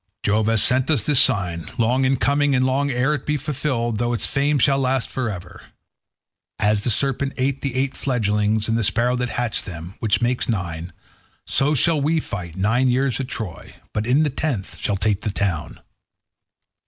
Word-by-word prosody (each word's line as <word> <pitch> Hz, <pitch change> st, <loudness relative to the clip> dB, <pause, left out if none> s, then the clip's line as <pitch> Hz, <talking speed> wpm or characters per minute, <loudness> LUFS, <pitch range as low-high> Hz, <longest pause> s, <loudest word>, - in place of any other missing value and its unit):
Jove 105 Hz, +1 st, +1 dB
has 115 Hz, -2 st, +3 dB
sent 130 Hz, +2 st, +3 dB
us 140 Hz, -10 st, +2 dB
this 140 Hz, +1 st, +3 dB
sign, 90 Hz, -8 st, +1 dB
long 125 Hz, +3 st, +2 dB
in 135 Hz, +1 st, +2 dB
coming, 140 Hz, +4 st, +2 dB
and 130 Hz, 0 st, +2 dB
long 135 Hz, +2 st, +1 dB
ere 130 Hz, +3 st, +1 dB
it 145 Hz, -, -3 dB
be 150 Hz, 0 st, 0 dB
fulfilled, 130 Hz, -6 st, -2 dB
though 120 Hz, 0 st, 0 dB
its 120 Hz, -, +2 dB
fame 145 Hz, +2 st, +1 dB
shall 135 Hz, +1 st, +3 dB
last 130 Hz, -2 st, 0 dB
for 130 Hz, -3 st, -2 dB
ever. 90 Hz, -3 st, -8 dB, 1.0 s
As 105 Hz, 0 st, +1 dB
the 120 Hz, -, -1 dB
serpent 135 Hz, +3 st, 0 dB
ate 135 Hz, +1 st, -1 dB
the 135 Hz, -3 st, -3 dB
eight 135 Hz, +1 st, 0 dB
fledglings 105 Hz, -4 st, 0 dB
and 115 Hz, -, +1 dB
the 115 Hz, -, 0 dB
sparrow 120 Hz, +4 st, +1 dB
that 125 Hz, 0 st, -2 dB
hatched 120 Hz, -2 st, -1 dB
them, 85 Hz, -1 st, -8 dB
which 105 Hz, -3 st, +1 dB
makes 120 Hz, +1 st, 0 dB
nine, 85 Hz, -5 st, -3 dB, 0.5 s
so 145 Hz, +3 st, +2 dB
shall 155 Hz, +3 st, +3 dB
we 160 Hz, +3 st, +2 dB
fight 90 Hz, -, -6 dB
nine 115 Hz, +7 st, +2 dB
years 130 Hz, +1 st, +1 dB
at 135 Hz, -, -3 dB
Troy, 110 Hz, -9 st, -7 dB, 0.2 s
but 105 Hz, +1 st, -2 dB
in 135 Hz, +5 st, +4 dB
the 150 Hz, -, 0 dB
tenth 125 Hz, -8 st, -3 dB
shall 100 Hz, -, -1 dB
take 105 Hz, 0 st, 0 dB
the 105 Hz, -, -2 dB
town. 95 Hz, -5 st, -2 dB
120 Hz, 190 wpm, -22 LUFS, 105-135 Hz, 1.0 s, in